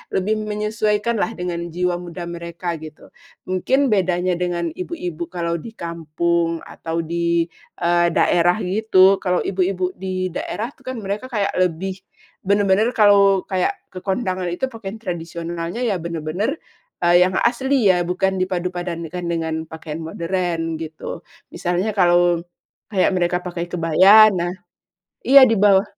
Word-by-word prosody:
lebih 210 +3 +1
menyesuaikan 215 +1 -1
lah - - +2
dengan 175 -1 -3
jiwa 180 0 0
muda 175 0 -7
mereka, 170 0 -5
gitu. 155 0 -12 0.4
Mungkin 265 +9 +1
bedanya 180 -2 +1
dengan 175 -1 -1
ibu-ibu 350 -1 -5
kalau 170 -1 -1
di 225 +7 -10
kampung 170 0 -1
atau 165 0 -4
di, 170 +1 0 0.4
eee, 175 0 +3
daerah 175 +1 +3
gitu, 195 -1 +4
kalau 180 -2 0
ibu-ibu 185 -1 -1
di 185 0 -3
daerah 220 +6 -4
tuh 260 -2 -24
kan 260 - -3
mereka 200 +4 -4
kayak 210 -6 -1
lebih 185 +1 -1 0.5
bener-bener 200 +3 +3
kalau 200 -2 +5
kayak 185 -2 0 0.2
ke 185 - -7
kondangan 185 -3 -1
itu 220 +10 -2
pakaian 220 -3 -7
tradisionalnya 170 +2 -5
ya 205 -7 0
bener-bener, 170 - -3 0.4
eee, 175 0 +5
yang 185 - -4
asli 250 -3 +3
ya, 175 -1 0
bukan 190 +1 0
dipadupadankan 180 -2 -3
dengan 160 -1 -2
pakaian 160 0 -7
modern, 165 0 -2
gitu. 160 -1 -7 0.3
Misalnya 180 +5 -1
kalau 175 -3 +3 0.5
kayak 190 - +3
mereka 180 0 +1
pakai 175 -1 -4
kebaya, 185 +6 +7
nah 175 -2 -2 0.7
iya 275 +2 +9
di 225 -3 +5
bawah 200 -1 +5
180 Hz, 135 wpm, -21 LUFS, 170-205 Hz, 0.7 s, iya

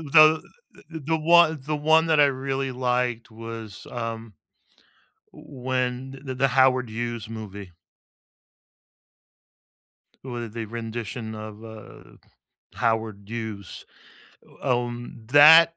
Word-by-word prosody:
the 155 0 +7 0.5
th 165 - -8
the 160 +1 0
one 160 -1 +5
the 150 +3 -3
one 160 +2 +4
that 160 -2 +3
I 145 - +7 0.2
really 135 0 -1
liked 125 -2 -1
was, 115 -2 -9
um, 115 -4 -6 1.0
when 130 -1 -4
the 130 -1 -5
the 135 +1 +2
Howard 130 -1 +3
Hughes 115 -1 -4
movie. 100 -4 -8 2.5
W 120 -3 -5
the 115 +1 -6
rendition 115 0 -6
of, 110 0 -9
uh, 110 -2 -13 0.6
Howard 110 -3 -1
Hughes, 110 -4 -7 0.8
um, 120 -3 -3
that 160 +3 +9
120 Hz, 105 wpm, -25 LUFS, 110-135 Hz, 2.5 s, that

